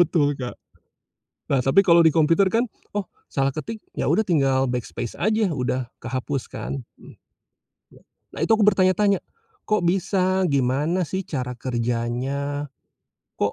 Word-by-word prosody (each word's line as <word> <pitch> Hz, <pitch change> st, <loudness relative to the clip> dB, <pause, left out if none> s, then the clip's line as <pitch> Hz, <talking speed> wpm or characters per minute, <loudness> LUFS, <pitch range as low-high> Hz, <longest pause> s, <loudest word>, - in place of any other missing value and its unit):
betul 155 Hz, -4 st, +3 dB
Kak. 125 Hz, -1 st, -5 dB, 1.0 s
Nah, 135 Hz, -, +3 dB
tapi 135 Hz, +10 st, +4 dB
kalau 170 Hz, -2 st, +6 dB
di 160 Hz, -1 st, +6 dB
komputer 165 Hz, +5 st, +4 dB
kan, 230 Hz, +5 st, +2 dB, 0.3 s
oh, 205 Hz, -, 0 dB, 0.2 s
salah 135 Hz, 0 st, 0 dB
ketik, 220 Hz, +10 st, -6 dB
ya -, -, -2 dB
udah 185 Hz, +9 st, +3 dB
tinggal 135 Hz, -7 st, +2 dB
backspace 120 Hz, -1 st, -4 dB
aja, 215 Hz, -2 st, +2 dB
udah 125 Hz, -3 st, -2 dB
kehapus 130 Hz, +1 st, -3 dB
kan. 135 Hz, -2 st, -5 dB, 1.5 s
Nah -, -, -8 dB
itu 195 Hz, -, +3 dB
aku 210 Hz, -, +3 dB
bertanya-tanya, 195 Hz, 0 st, +3 dB, 0.5 s
kok 215 Hz, -4 st, +2 dB
bisa? 185 Hz, +1 st, +1 dB
Gimana 140 Hz, +7 st, +1 dB
sih 190 Hz, +5 st, -3 dB
cara 125 Hz, -8 st, -4 dB
kerjanya? 125 Hz, +4 st, -2 dB, 0.7 s
Kok, 100 Hz, -, 0 dB
150 Hz, 135 wpm, -23 LUFS, 130-185 Hz, 1.5 s, kalau